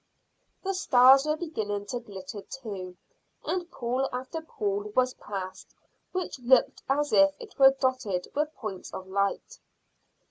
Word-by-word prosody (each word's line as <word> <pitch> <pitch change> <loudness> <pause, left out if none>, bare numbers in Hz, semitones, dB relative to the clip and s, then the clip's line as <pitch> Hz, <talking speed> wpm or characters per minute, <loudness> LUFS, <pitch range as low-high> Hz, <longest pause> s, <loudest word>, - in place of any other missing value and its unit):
The 390 0 -1
stars 270 -5 +6
were 305 0 +1
beginning 215 - -3
to 245 - -2
glitter 200 -2 -8
too, 195 -8 -7 0.5
and 360 -1 -2
pool 255 +1 -1
after 260 +6 -4
pool 410 +5 -3
was 255 0 +3
passed 190 -2 -7 0.4
which 370 -7 -3
looked 250 +1 +3
as 290 +2 +1
if 290 0 +6
it 450 -9 -12
were 270 0 +8
dotted 250 -9 0
with 300 +1 0
points 210 -6 -6
of 190 - -6
light. 200 +1 -2
255 Hz, 140 wpm, -28 LUFS, 205-305 Hz, 0.5 s, were